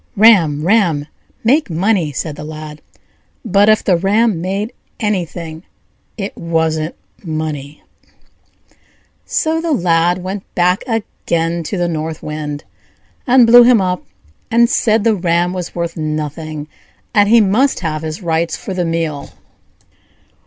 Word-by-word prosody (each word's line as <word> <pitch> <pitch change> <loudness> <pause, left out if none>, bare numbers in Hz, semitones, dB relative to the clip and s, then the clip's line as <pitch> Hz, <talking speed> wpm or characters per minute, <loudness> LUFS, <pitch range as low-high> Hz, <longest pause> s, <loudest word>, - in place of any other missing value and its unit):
"Ram, 175 -9 +5
ram! 175 -8 +2 0.4
make 275 +5 +2
money!" 175 -1 +1
said 145 +2 -4
the 150 - -8
Lad; 155 0 -8 0.6
but 205 0 +4
if 215 - +4
the 185 - +3
ram 200 +1 +1
made 195 +5 -3 0.3
anything, 175 -6 -3 0.6
it 200 -2 -5
wasn't 160 -1 -1 0.3
money. 155 -3 -5 1.4
So 320 +1 0
the 335 -1 -2
Lad 175 -3 +1
went 190 +1 -4
back 180 +1 +2
again 170 -7 -2
to 200 - -3
the 175 -1 0
North 160 -1 -4
Wind, 150 -1 -5 0.6
and 250 -1 +6
blew 240 +1 +8
him 240 -1 +6
up, 180 -1 -1 0.5
and 235 +1 +4
said 220 -3 +2
the 225 -1 +3
ram 175 -2 0
was 180 -2 -5
worth 170 -1 -3
nothing, 155 0 -4 0.5
and 205 -2 +4
he 235 +1 +7
must 220 +6 +2
have 155 -3 -2
his 160 +4 -6
rights 165 0 0
for 195 - -6
the 180 -1 -1
meal. 165 -4 -2
175 Hz, 135 wpm, -16 LUFS, 155-210 Hz, 1.4 s, blew